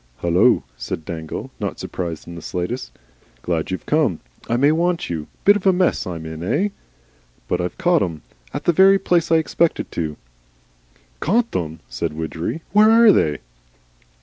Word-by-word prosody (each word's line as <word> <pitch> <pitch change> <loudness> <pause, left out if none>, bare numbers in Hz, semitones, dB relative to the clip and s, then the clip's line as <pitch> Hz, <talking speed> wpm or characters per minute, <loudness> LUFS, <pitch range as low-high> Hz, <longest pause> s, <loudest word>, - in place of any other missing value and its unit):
"Hullo!" 90 +8 +4
said 80 - -5
Dangle, 80 -2 -6
not - - -3
surprised 85 -3 -5
in 85 - -8
the 85 - -8
slightest. 90 +11 -4 0.5
"Glad 85 -3 -1
you've 95 - -4
come. 150 - +1 0.3
I 120 - +2
may 140 +4 +4
want 170 - 0
you. 80 -3 -4 0.2
Bit 205 - +7
of 195 - -2
a - - +7
mess 180 - +1
I'm 85 -3 -5
in 80 0 -7
eigh? 200 - 0 0.8
But - - 0
I've 90 - -4
caught 175 -3 +3
'em. 80 -4 -3 0.3
At - - -5
the 175 - +3
very 195 +3 +6
place 175 -4 +1
I - - +6
expected, 160 +1 +1
too." 80 -3 -3 1.0
"Caught 230 +7 +1
them!" 80 -2 -3
said 75 +6 -3
Widgery. 80 - -4
"Where 210 +3 +6
are 225 -1 +7
they?" 75 - +1
110 Hz, 170 wpm, -21 LUFS, -, 1.0 s, Bit